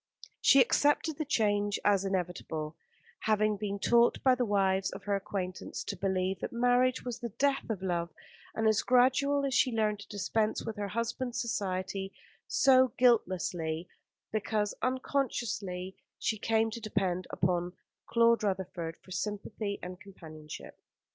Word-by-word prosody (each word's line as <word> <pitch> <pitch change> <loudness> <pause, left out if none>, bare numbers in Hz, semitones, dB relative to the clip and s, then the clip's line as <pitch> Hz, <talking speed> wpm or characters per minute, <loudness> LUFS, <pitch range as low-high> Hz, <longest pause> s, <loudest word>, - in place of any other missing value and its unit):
She 275 - +7
accepted 290 +4 +2
the 310 - -1
change 205 -5 +1
as 200 -2 +4
inevitable, 175 -5 -3 0.5
having 215 -1 +2
been 200 0 -3
taught 235 +3 +4
by 260 - +6
the 250 -2 0
wives 195 -2 +2
of - - -9
her 200 0 0
acquaintance 185 -2 -4
to - - -4
believe 190 0 -1
that - - -4
marriage 245 +2 +2
was 245 -2 -4
the 235 - -4
death 270 +5 0
of 200 -4 -3
love, 170 -2 -1 0.5
and 220 0 +1
as 220 0 +3
gradually 275 +3 +3
as - - -4
she 255 - +3
learned 215 -2 0
to 205 - -11
dispense 215 +1 -1
with 225 -1 -4
her 205 -1 -2
husband's 235 +3 -2
society, 195 -4 -2 0.4
so 260 -2 +5
guiltlessly, 180 -8 +1 0.4
because 215 -1 -1
unconsciously, 230 -8 -2 0.2
she 220 - -1
came 225 0 +1
to 235 +1 -6
depend 185 -4 -1
upon 175 0 0 0.3
Claude 235 0 +4
Rutherford 185 -5 -3
for 185 - -18
sympathy 205 +1 -3
and 180 +2 -7
companionship. 155 -6 -10
205 Hz, 145 wpm, -31 LUFS, 185-235 Hz, 0.5 s, She